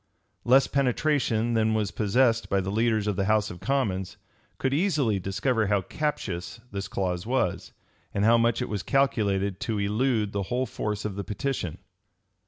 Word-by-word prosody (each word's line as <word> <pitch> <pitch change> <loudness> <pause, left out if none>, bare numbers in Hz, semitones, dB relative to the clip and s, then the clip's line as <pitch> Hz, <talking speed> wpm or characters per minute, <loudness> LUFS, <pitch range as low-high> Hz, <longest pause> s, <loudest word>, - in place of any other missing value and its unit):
[*] - - -46
Less 130 +3 +5
penetration 130 -4 +1
than 110 -1 +2
was 105 -2 0
possessed 115 +2 +2
by 100 - +2
the 95 0 -2
leaders 110 0 +1
of 105 -2 0
the 95 - +1
house 110 0 +2
of 85 - -9
commons, 100 -10 -1 0.4
could 130 0 0
easily 145 - +1
discover 100 +4 0
how 100 -1 +1
captious 105 - -3
this 100 0 -4
clause 90 -1 -2
was, 125 -8 -1 0.4
and 100 +1 0
how 115 +1 +6
much 115 -1 +2
it - - -4
was 105 -3 -3
calculated 100 -8 +1
to 110 -2 -2
elude 105 +1 +1
the 100 - -2
whole 125 +1 0
force 105 -3 -4
of 105 - -2
the 100 - -2
petition. 105 - -3
110 Hz, 175 wpm, -27 LUFS, 100-125 Hz, 0.4 s, how